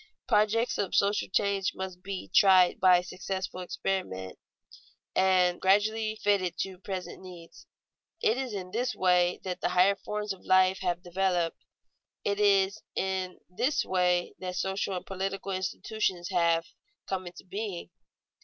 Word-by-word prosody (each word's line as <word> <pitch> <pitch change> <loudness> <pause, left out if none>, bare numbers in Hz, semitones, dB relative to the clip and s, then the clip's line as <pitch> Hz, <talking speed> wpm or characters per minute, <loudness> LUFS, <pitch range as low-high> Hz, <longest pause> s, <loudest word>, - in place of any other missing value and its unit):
Projects 225 +3 +2
of 195 - -1
social 205 +1 +2
change 200 0 +1
must 185 -1 -6
be 195 0 -5
tried 185 -2 +6
by 180 -1 +6
successful 185 +1 -5
experiment, 180 - -3 0.8
and 185 -2 +3
gradually 215 +3 +2
fitted 190 -4 +1
to 190 -2 -5
present 190 -2 -6
needs. 175 -3 -12 0.5
It 220 - +2
is 260 -1 -3
in 185 -2 -6
this 245 +4 -1
way 180 -1 +3
that 185 -1 -4
the - - +1
higher 180 +2 +4
forms 210 0 -4
of 190 - -16
life 185 0 +4
have 180 -1 -2
developed; 175 -2 -1 0.6
it 200 0 -1
is 200 0 +3
in 190 -1 -2
this 245 - 0
way 180 -1 +1
that 180 -1 -5
social 190 +1 -1
and - - -7
political 195 +1 -4
institutions 190 -1 -2
have 170 -3 +2 0.4
come 185 -2 -3
into 175 - -10
being. 195 -1 -5
190 Hz, 140 wpm, -29 LUFS, 180-200 Hz, 0.8 s, tried